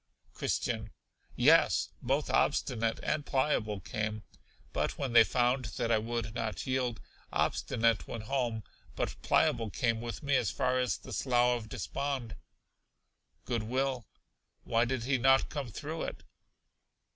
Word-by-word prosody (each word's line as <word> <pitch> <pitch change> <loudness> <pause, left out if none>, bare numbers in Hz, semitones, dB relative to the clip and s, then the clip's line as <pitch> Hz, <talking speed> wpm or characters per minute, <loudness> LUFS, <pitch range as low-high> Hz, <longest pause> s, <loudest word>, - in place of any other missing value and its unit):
Christian. - - -1 0.5
Yes, - - +4
both 135 +4 0
Obstinate 115 -6 +1
and 150 - 0
Pliable 130 -8 0
came, 110 +2 -3 0.5
but - - -1
when 135 -4 -2
they 115 -1 +9
found 125 +3 +1
that 120 -2 0
I 110 - +4
would 115 -1 -3
not 115 -2 -3
yield, 125 -4 -1 0.3
Obstinate 115 -2 +1
went 115 -2 -5
home, 120 -3 -1 0.3
but - - -2
Pliable 115 -2 +2
came 115 +2 0
with 120 +5 -6
me 140 -1 +2
as 125 -5 +2
far 130 0 +1
as 125 -1 0
the - - -10
Slough 125 -1 +3
of 110 -2 -6
Despond. 135 -3 -3 1.1
Good 120 -3 -1
will. 130 0 -1 0.6
Why 115 +1 +2
did 125 -1 -2
he 130 +1 +1
not 135 +2 +4
come 145 -4 -4
through 155 +8 -5
it? - - -7
120 Hz, 140 wpm, -31 LUFS, 115-130 Hz, 1.1 s, they